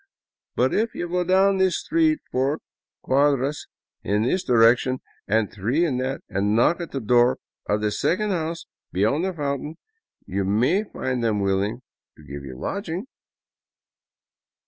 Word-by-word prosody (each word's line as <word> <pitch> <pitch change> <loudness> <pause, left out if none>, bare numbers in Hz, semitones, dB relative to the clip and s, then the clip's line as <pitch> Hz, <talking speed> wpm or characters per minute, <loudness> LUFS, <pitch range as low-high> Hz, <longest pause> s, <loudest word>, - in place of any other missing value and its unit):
But - - +2
if 220 +1 0
you 175 - -3
go 180 +1 0
down 190 +2 +3
this 190 -1 +3
street 315 -1 +1
four 135 +4 +1 0.5
cuadras 140 +1 +1 0.3
in 105 +2 0
this 180 +10 0
direction 125 +2 +4 0.3
and 110 0 +1
three 120 - +1
in 135 -7 -1
that 130 +2 -2
and 100 +2 0
knock 170 +10 +3
at 170 - -5
the 135 - -3
door 120 +2 +3 0.3
of 105 +1 +1
the 105 -1 0
second 205 - 0
house 165 -2 -3 0.3
beyond 110 - +1
the 190 - -2
fountain, 145 0 -3 0.5
you 100 +1 -2
may 125 - +2
find 130 - -3
them 110 -3 +1
willing 100 +5 0 0.3
to 75 - -16
give 70 0 -8
you 65 -2 -8
lodging." 185 - -4
130 Hz, 150 wpm, -24 LUFS, 105-175 Hz, 0.5 s, direction